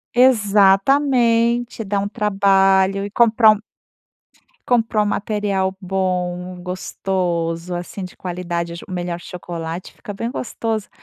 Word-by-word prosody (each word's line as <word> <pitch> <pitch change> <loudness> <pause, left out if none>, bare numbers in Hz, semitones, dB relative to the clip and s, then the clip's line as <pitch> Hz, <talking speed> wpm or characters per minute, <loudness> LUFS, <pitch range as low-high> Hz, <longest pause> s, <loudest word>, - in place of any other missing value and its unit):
Exatamente, 235 +1 +3
dá 200 -1 -1
um 200 - -1
trabalho 195 -1 +2
e 205 - -7
compra 225 0 +5
um 215 - 0 1.1
compra 225 -3 +2
um 210 - +2
material 200 -2 -1
bom, 180 -1 -2
gostoso, 180 -2 -3
assim, 175 +3 -5
de 180 - -8
qualidade, 175 -2 -4
o - - -7
ch - - -10
o - - -12
melhor 175 -1 -3
chocolate 170 -1 -7
fica 205 - -9
bem 230 +4 -4
gostoso. 225 -3 -3
195 Hz, 125 wpm, -20 LUFS, 180-220 Hz, 1.1 s, compra